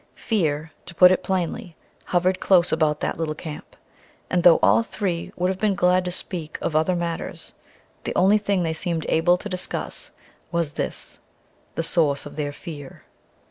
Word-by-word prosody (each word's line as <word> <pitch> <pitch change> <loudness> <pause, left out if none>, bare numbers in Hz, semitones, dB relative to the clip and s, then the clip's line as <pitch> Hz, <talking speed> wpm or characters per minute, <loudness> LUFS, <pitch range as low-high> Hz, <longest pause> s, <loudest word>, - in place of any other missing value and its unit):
Fear, 160 -7 -1 0.2
to 175 - -9
put 180 +1 +8
it 185 - +2
plainly, 185 0 -3 0.3
hovered 185 +1 +1
close 180 -2 +4
about 155 -2 +1
that - - -2
little 155 -2 -2
camp, 155 -1 -9 0.6
and 180 - +2
though 170 -1 +7
all - - +5
three 190 -6 -3
would 180 +1 0
have 190 0 -3
been 210 -2 +1
glad 180 +1 +3
to 180 - -2
speak 170 -3 -3
of 155 - -2
other 160 +4 +2
matters, 170 -1 -4 0.5
the - - -3
only 200 +3 +5
thing 200 -3 0
they 160 -1 -1
seemed 165 -1 -2
able 175 +2 +3
to 210 - -7
discuss 185 -2 -3 0.4
was 170 -3 0
this - - -4 0.6
the 165 - -1
source 155 -4 +2
of - - -9
their 145 -2 -2
fear. 145 -2 -10
175 Hz, 175 wpm, -23 LUFS, 160-185 Hz, 0.6 s, put